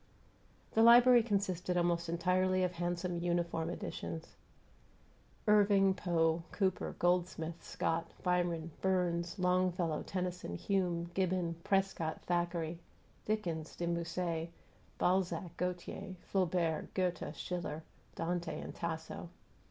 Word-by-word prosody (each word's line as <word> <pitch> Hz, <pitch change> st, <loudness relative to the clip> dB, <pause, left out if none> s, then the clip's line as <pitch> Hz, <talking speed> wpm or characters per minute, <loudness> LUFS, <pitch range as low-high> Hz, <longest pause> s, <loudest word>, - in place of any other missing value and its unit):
The 225 Hz, -, +3 dB
library 240 Hz, +1 st, +8 dB
consisted 190 Hz, -5 st, 0 dB
almost 170 Hz, -1 st, +1 dB
entirely 185 Hz, +2 st, +2 dB
of 180 Hz, -, +1 dB
handsome 175 Hz, 0 st, -2 dB
"uniform 170 Hz, -1 st, 0 dB
editions": 165 Hz, -1 st, -5 dB, 1.1 s
Irving, 200 Hz, -2 st, +5 dB
Poe, 165 Hz, -3 st, +1 dB
Cooper, 190 Hz, -3 st, 0 dB
Goldsmith, 175 Hz, -2 st, 0 dB
Scott, 165 Hz, +1 st, -1 dB
Byron, 175 Hz, -2 st, 0 dB
Burns, 180 Hz, -1 st, +1 dB
Longfellow, 180 Hz, -3 st, +1 dB
Tennyson, 180 Hz, -, -3 dB
Hume, 175 Hz, -, 0 dB
Gibbon, 185 Hz, -2 st, 0 dB
Prescott, 195 Hz, -5 st, 0 dB
Thackeray, 170 Hz, -1 st, -1 dB, 0.5 s
Dickens, 170 Hz, -7 st, -2 dB
De 175 Hz, -, -2 dB
Musset, 170 Hz, -1 st, -2 dB, 0.5 s
Balzac, 180 Hz, -2 st, +1 dB
Gautier, 180 Hz, +2 st, -4 dB
Flaubert, 175 Hz, -4 st, 0 dB
Goethe, 180 Hz, -2 st, -1 dB
Schiller, 165 Hz, -3 st, -4 dB, 0.3 s
Dante, 170 Hz, +1 st, -2 dB
and -, -, -7 dB
Tasso. 160 Hz, 0 st, -5 dB
175 Hz, 100 wpm, -34 LUFS, 170-185 Hz, 1.1 s, library